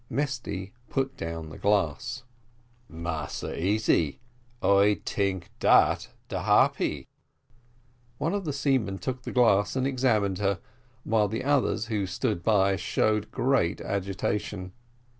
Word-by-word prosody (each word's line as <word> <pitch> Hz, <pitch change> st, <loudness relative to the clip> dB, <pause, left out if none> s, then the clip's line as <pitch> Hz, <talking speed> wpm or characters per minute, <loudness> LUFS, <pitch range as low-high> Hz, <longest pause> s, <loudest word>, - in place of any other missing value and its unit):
Mesty 115 Hz, -9 st, -3 dB, 0.2 s
put 135 Hz, 0 st, -1 dB
down 80 Hz, -1 st, -5 dB
the 80 Hz, -, -10 dB
glass. 105 Hz, -, 0 dB, 0.7 s
"Massa 80 Hz, -4 st, -4 dB
Easy 100 Hz, -6 st, +2 dB, 0.4 s
I 100 Hz, -1 st, +4 dB
tink 95 Hz, -2 st, -1 dB
dat -, -, +4 dB, 0.2 s
de -, -, -3 dB
Harpy." -, -, +2 dB, 1.1 s
One 160 Hz, +6 st, -1 dB
of 205 Hz, -1 st, -1 dB
the 155 Hz, -, -2 dB
seamen 135 Hz, -8 st, 0 dB
took 125 Hz, +7 st, -4 dB
the -, -, -6 dB
glass 105 Hz, -5 st, +3 dB
and 130 Hz, 0 st, +1 dB
examined 115 Hz, -8 st, +1 dB
her, 100 Hz, -1 st, +1 dB, 0.5 s
while 110 Hz, -2 st, +2 dB
the 110 Hz, +3 st, -3 dB
others 140 Hz, -5 st, +1 dB
who 105 Hz, -4 st, -1 dB
stood 105 Hz, 0 st, -1 dB
by 100 Hz, -1 st, +3 dB
showed 105 Hz, +2 st, 0 dB
great 125 Hz, -10 st, +1 dB
agitation. 100 Hz, 0 st, -3 dB
105 Hz, 120 wpm, -27 LUFS, 95-125 Hz, 1.1 s, I